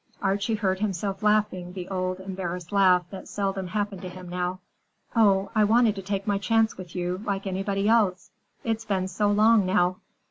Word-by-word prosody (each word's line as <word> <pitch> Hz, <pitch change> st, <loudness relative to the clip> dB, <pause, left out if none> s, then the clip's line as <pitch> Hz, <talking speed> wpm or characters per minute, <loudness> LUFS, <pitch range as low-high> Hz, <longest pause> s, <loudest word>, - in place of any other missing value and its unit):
Archie 200 Hz, +3 st, 0 dB
heard 190 Hz, -3 st, 0 dB
himself 195 Hz, -1 st, -2 dB
laughing 210 Hz, -4 st, +1 dB
the 180 Hz, -2 st, -6 dB
old, 185 Hz, -1 st, -2 dB
embarrassed 180 Hz, -2 st, -5 dB
laugh 185 Hz, -3 st, +4 dB
that 195 Hz, -, -8 dB
seldom 195 Hz, -2 st, -2 dB
happened 205 Hz, -1 st, -3 dB
to 185 Hz, -, -6 dB
him 180 Hz, 0 st, -10 dB
now. 180 Hz, +1 st, -3 dB, 0.6 s
"Oh, 200 Hz, -3 st, +3 dB
I 215 Hz, -, +4 dB
wanted 225 Hz, +1 st, +4 dB
to 195 Hz, -, -6 dB
take 195 Hz, 0 st, -3 dB
my 205 Hz, -1 st, 0 dB
chance 225 Hz, +3 st, +2 dB
with 180 Hz, -2 st, -10 dB
you, 180 Hz, +1 st, -2 dB
like 200 Hz, -3 st, -2 dB
anybody 195 Hz, +1 st, -1 dB
else. 210 Hz, -5 st, +2 dB, 0.3 s
It's 225 Hz, -1 st, -1 dB
been 190 Hz, -3 st, -1 dB
so 205 Hz, +3 st, 0 dB
long, 215 Hz, +1 st, +5 dB
now!" 185 Hz, 0 st, +2 dB
195 Hz, 180 wpm, -26 LUFS, 185-210 Hz, 0.6 s, long